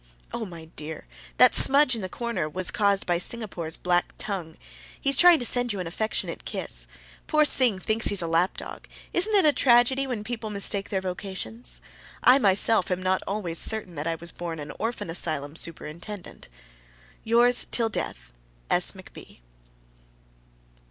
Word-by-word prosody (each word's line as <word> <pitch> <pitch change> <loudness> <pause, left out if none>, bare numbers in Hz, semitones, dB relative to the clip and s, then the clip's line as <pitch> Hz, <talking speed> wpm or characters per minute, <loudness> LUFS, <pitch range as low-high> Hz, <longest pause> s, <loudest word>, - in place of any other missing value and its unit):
Oh, 225 -3 -3
my 170 -3 -10
dear! 155 0 -7 0.3
that 250 - +7
smudge 280 -1 +5
in 225 - -2
the 185 - -4
corner 235 -10 -3
was 185 +3 -2
caused 200 -4 +1
by 175 -1 +1
Singapore's 180 -6 -3
black 175 0 0
tongue. 175 -6 -5 0.4
He 275 - 0
is - - +4
trying 350 +3 +7
to 245 - -1
send 245 0 +2
you 200 - -4
an 180 - -3
affectionate 215 +6 -3
kiss. - - -1 0.4
Poor 305 -1 +3
Sing 250 -8 +4
thinks 220 +4 -1
he's 200 -3 -1
a - - -2
lap 165 +3 +1
dog - - -8 0.3
isn't 415 +5 +2
it 390 - +5
a 300 - +5
tragedy 255 +1 +3
when 235 -5 -3
people 225 -1 -5
mistake 200 -1 0
their 190 -2 -1
vocations? 190 +5 -6 0.4
I 260 +2 +7
myself 205 -2 +3
am 185 0 -2
not 185 0 +1
always 185 -5 -3
certain 220 -5 +1
that 150 0 -4
I 165 - 0
was 170 +1 -9
born 170 -2 -6
an 145 0 -7
orphan 225 -6 -3
asylum 155 -3 -2
superintendent. 170 +4 -7 0.8
Yours, 240 +2 +3
til 230 -2 0
deth, - - -5 0.4
S. - - +3
McB. - - -13
200 Hz, 165 wpm, -26 LUFS, 170-240 Hz, 0.8 s, that